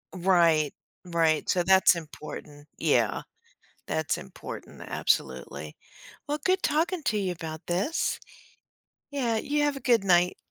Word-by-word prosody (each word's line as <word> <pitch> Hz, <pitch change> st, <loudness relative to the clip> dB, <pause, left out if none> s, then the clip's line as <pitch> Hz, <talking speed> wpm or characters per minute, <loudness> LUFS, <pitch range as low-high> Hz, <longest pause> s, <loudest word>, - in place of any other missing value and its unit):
Right, 170 Hz, -5 st, +3 dB, 0.3 s
right. 165 Hz, -3 st, +1 dB
So, 180 Hz, -1 st, +2 dB
that's 190 Hz, 0 st, +6 dB
important. 150 Hz, -2 st, -9 dB
Yeah. -, -, +2 dB, 0.7 s
That's -, -, -1 dB
important, -, -, -9 dB
absolutely. -, -, -2 dB, 0.5 s
Well, 295 Hz, +1 st, -1 dB
good 370 Hz, 0 st, +2 dB
talking 325 Hz, +2 st, +1 dB
to 215 Hz, -, +1 dB
you 185 Hz, -3 st, -1 dB
about 160 Hz, -2 st, -6 dB
this. 195 Hz, -, 0 dB, 0.9 s
Yeah, 240 Hz, -6 st, 0 dB
you 295 Hz, +5 st, 0 dB
have 290 Hz, -1 st, +1 dB
a -, -, -6 dB
good 235 Hz, -5 st, +3 dB
night. 180 Hz, -1 st, +4 dB
185 Hz, 125 wpm, -27 LUFS, 165-275 Hz, 0.9 s, that's